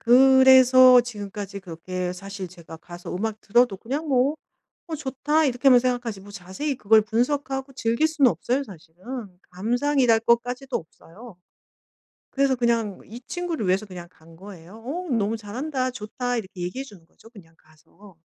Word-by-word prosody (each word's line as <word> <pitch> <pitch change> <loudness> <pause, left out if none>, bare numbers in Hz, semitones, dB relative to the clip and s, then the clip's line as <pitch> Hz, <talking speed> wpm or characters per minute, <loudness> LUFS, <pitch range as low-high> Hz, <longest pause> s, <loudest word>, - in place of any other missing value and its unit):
그래서 255 0 +7
지금까지 205 -4 -7
그렇게 180 +1 -5
사실 195 0 -8
제가 170 -2 -12
가서 175 +2 -9
음악 215 +2 -3
들어도 240 0 +2
그냥 275 +10 -4
뭐 270 +2 +2 0.5
'어 330 - -5
좋다.' 295 +2 0
이렇게만 250 0 +4
생각하지 245 -5 -2
뭐 205 +1 -14
자세히 200 +11 -5
그걸 220 -1 +4
분석하고 270 +4 -2
즐길 235 +4 +1
수는 300 -5 +3
없어. 245 - -1
사실은. 175 - -16 0.5
감상이랄 240 +4 +1
것까지도 245 +3 0
없어요. 185 +6 -12 0.9
그래서 270 -1 +1
그냥 230 -4 0
이 235 +3 -11
친구를 350 - -4
위해서 190 +4 +1
그냥 180 -3 -10
간 165 -1 -19
거예요. 195 +3 -13
"어 345 +6 -5
너무 225 -1 0
잘한다. 255 +5 -3
좋다." 245 +2 -4
이렇게 190 -4 -7
얘기해 180 +10 -4
주는 200 -11 -16
거죠 225 - -20
그냥 175 -8 -17
가서. 160 +4 -21
230 Hz, 345 characters per minute, -24 LUFS, 190-260 Hz, 0.9 s, 그래서